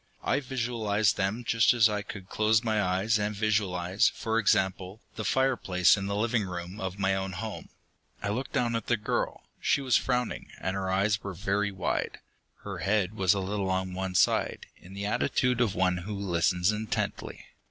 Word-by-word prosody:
I - - +1
visualized 115 -6 0
them 105 +5 -1
just 115 +1 +3
as 115 -2 +6
I 105 -1 -2
could 100 -2 -9
close 110 +2 +2
my 110 -2 +1
eyes 100 +4 +1
and 105 0 -1
visualize, 100 -3 +1
for 110 0 -1
example, 95 -1 +1 0.2
the 110 - -4
fireplace 105 -8 +3
in 100 -1 -4
the 100 - -2
living 110 +1 +1
room 90 +2 -6
of 95 0 -4
my 95 -1 +1
own 95 0 -2
home. 110 +3 -6 0.5
I 100 - -3
looked 120 +5 -3
down 120 -1 0
at 115 - -3
the 120 - +2
girl. 105 - -2 0.2
She - - +2
was 130 -3 +3
frowning, 125 -2 -2
and 95 +1 -2
her 95 -1 -2
eyes 100 +3 +1
were 100 -2 -5
very 100 +2 0
wide. 95 -2 -2 0.5
Her - - -6
head 100 0 +1
was 95 -1 +3
a - - -1
little 95 0 -2
on 95 0 -1
one 95 0 -3
side, - - +2
in 95 +2 -14
the 100 0 -4
attitude 125 +3 +1
of 110 -6 +1
one 90 -1 +2
who 100 +4 -5
listens 90 -1 +1
intently. 105 0 -3
100 Hz, 185 wpm, -28 LUFS, 95-110 Hz, 0.5 s, as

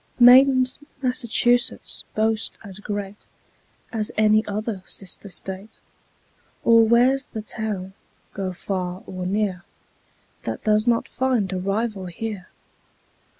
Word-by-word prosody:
Mayn't 255 +1 +7 0.2
Massachusetts 245 -1 +1
boast 220 0 0
as 195 -2 -10
great 205 -1 -5 0.7
As 215 -2 -1
any 215 0 +4
other 210 -1 -3
sister 195 +1 -6
state? 190 +3 -6 0.9
Or 230 -1 +6
where's 250 +4 +3
the 220 - -6
town, 210 -4 -4 0.4
go 190 -1 -3
far 180 0 -4
or 185 -1 -5
near, 195 -2 -1 0.8
That - - -5
does 215 +1 +2
not 235 -1 +2
find 245 -8 0
a 185 - -1
rival 200 0 -2
here? 200 +1 -6
215 Hz, 110 wpm, -23 LUFS, 190-235 Hz, 0.9 s, Mayn't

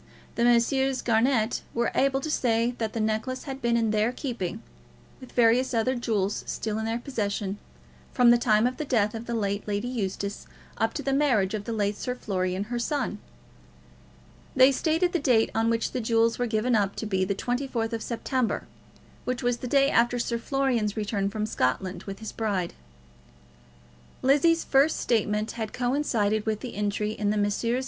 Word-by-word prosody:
The 235 - 0
Messrs. 255 +3 +2
Garnett 230 0 +2
were 235 0 +1
able 270 0 +2
to 310 - -3
say 235 -3 +1
that 220 -2 -2
the 230 - -3
necklace 220 +4 -1
had 270 -1 -6
been 235 -1 +2
in 225 -2 +1
their 215 +2 +2
keeping, 230 - -4 0.6
with 255 - -12
various 240 +2 +3
other 230 +3 +2
jewels 215 -5 -1
still 220 -1 -3
in 220 - -2
their 225 +1 -1
possession, 205 -5 -3 0.5
from 245 -2 +5
the 240 - +5
time 215 -2 +3
of 250 +1 -1
the - - -2
death 220 -7 +1
of 230 +1 -7
the 235 - -2
late 200 -2 -2
Lady 205 +3 -1
Eustace, 200 -4 -4 0.3
up 225 0 0
to - - -3
the 275 - 0
marriage 245 -9 +2
of 210 -1 -3
the 230 - -4
late 205 -2 0
Sir 250 +3 -3
Florian, 185 -4 -2
her 240 +3 -4
son. 250 -4 -2 1.4
They 260 +1 +7
stated 325 +5 +1
the 350 - +2
date 245 -6 +3
on 225 +1 +1
which 230 -1 0
the 250 - -2
jewels 230 +1 +2
were 245 - +1
given 225 +2 0
up 200 -2 +1
to - - -4
be 190 -3 0
the 195 +1 -1
24th 245 -1 -2
of 225 - -2
September, 245 +1 -2 0.6
which 250 -1 -3
was 245 0 +1
the 250 - -6
day 275 +2 +3
after 240 +1 +3
Sir 235 -1 -1
Florian's 240 -5 0
return 205 -2 -1
from 215 +1 -2
Scotland 185 +1 -1
with 195 -1 -6
his 220 -1 -7
bride. 200 -6 -2 1.5
Lizzie's 310 +5 +4
first 280 +3 +3
statement 215 -1 0
had 220 -2 -5
coincided 235 -5 0
with 215 -1 -1
this 250 - -5
entry 210 +1 -1
in 210 -1 -1
the 210 - +1
Messrs. 210 +4 0
230 Hz, 185 wpm, -26 LUFS, 210-250 Hz, 1.5 s, They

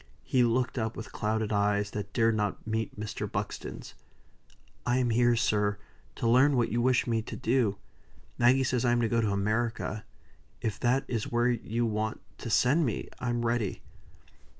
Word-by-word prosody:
He 125 - +2
looked 125 +2 +1
up 110 0 -2
with 110 - -7
clouded 110 0 -1
eyes, 100 0 +1
that 100 -1 -5
dared 115 0 +2
not 105 -2 -2
meet 110 -1 -3
Mr. 105 -1 -4
Buxton's. - - -5 0.9
"I 125 0 +1
am 125 -2 +1
here, 120 +1 +4
sir, 105 -2 +1 0.4
to 115 - -1
learn 130 +4 +5
what 120 - +1
you 120 - +1
wish 125 -1 +3
me 115 -2 0
to - - -7
do. 115 -4 +1 0.6
Maggie 125 +2 +5
says 125 -2 0
I 120 -1 +3
am 120 - +2
to 115 - +2
go 115 +1 +1
to 110 - +1
America; 110 +1 -1 0.6
if 110 -2 -3
that 125 +2 +2
is 115 -3 -3
where 120 +1 +2
you 115 0 -1
want 110 0 -2 0.2
to 115 - -5
send 135 +9 +3
me, 120 -7 -2
I'm 120 -1 -1
ready." 115 -4 -1
115 Hz, 175 wpm, -29 LUFS, 110-120 Hz, 0.9 s, learn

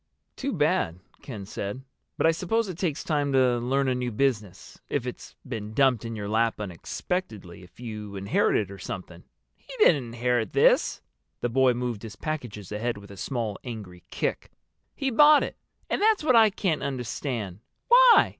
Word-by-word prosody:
"Too - - -3
bad," 85 +2 +1 0.2
Ken 110 -7 -7
said. 105 +5 -5 0.3
"But - - +1
I 165 - +6
suppose 200 +7 0
it 185 - -5
takes 165 -5 -1
time 145 -3 0
to 125 -2 +3
learn 135 +3 +1
a 130 - +2
new 125 -1 -2
business, 105 -6 -2
if 140 -4 -1
it's 125 - -7
been 110 -3 -5
dumped 130 -5 +3
in 115 -1 -5
your 105 -2 -4
lap 110 +1 +1
unexpectedly—if 95 - -5
you 105 -4 -7
inherit 100 +1 +1
it 100 -3 -2
or 100 - -9
something." 90 -2 -7 0.3
"He - - -16
didn't 150 - +5
inherit 120 -2 -1
this." - - +3 0.4
The 120 - 0
boy 130 0 +3
moved 120 -4 -3
his 110 -3 -8
packages 120 - -5
ahead 110 +2 -2
with 100 -1 -12
a - - -9
small 115 -1 -3
angry 105 -8 -8
kick. - - -2 0.5
"He 270 -1 -1
bought 295 +4 +7
it. - - -5 0.3
And - - -1
that's 430 -4 +3
what 255 -5 +4
I 225 -1 +7
can't 190 -5 -1
understand. 120 -6 -4 0.3
Why? - - +7
120 Hz, 175 wpm, -26 LUFS, 105-145 Hz, 0.5 s, bought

